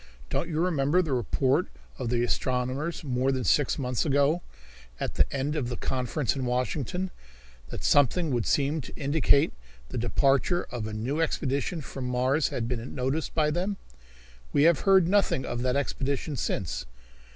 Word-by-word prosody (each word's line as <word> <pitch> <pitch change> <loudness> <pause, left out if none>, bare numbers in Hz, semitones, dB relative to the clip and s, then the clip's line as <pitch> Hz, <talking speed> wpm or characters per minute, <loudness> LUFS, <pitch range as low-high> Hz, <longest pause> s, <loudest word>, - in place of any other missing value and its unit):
"Don't 170 - -1
you 155 -1 -1
remember 165 +1 +2
the 155 -5 -2
report 130 +2 +1 0.3
of 115 - -2
the 120 0 +1
astronomers 130 +7 -1
more 130 -1 +1
than 130 -1 -1
six 145 +1 +2
months 125 -4 -1
ago, 145 +3 +2 0.6
at - - -3
the - - +2
end 140 +2 -1
of 130 -6 -1
the 120 - -4
conference 130 +1 -1
in 135 - -3
Washington, 130 - -1 0.6
that - - -6
something 145 +4 +3
would 120 -3 0
seem 145 +2 +1
to 125 - -11
indicate 140 - +3 0.4
the - - -3
departure 135 +8 +2
of 115 -3 -3
a - - -5
new 130 +9 -1
expedition 150 +1 -1
from 135 -2 -6
Mars 130 +4 +2
had 115 - -3
been 120 0 -4
noticed 135 +4 -2
by 150 -1 +2
them? 185 +5 -1 0.7
We 145 - +3
have 165 -1 +5
heard 190 -3 +6
nothing 195 -8 +2
of 120 0 -3
that 125 0 +1
expedition 140 +1 -1
since. 80 - -2
135 Hz, 165 wpm, -27 LUFS, 125-155 Hz, 0.7 s, heard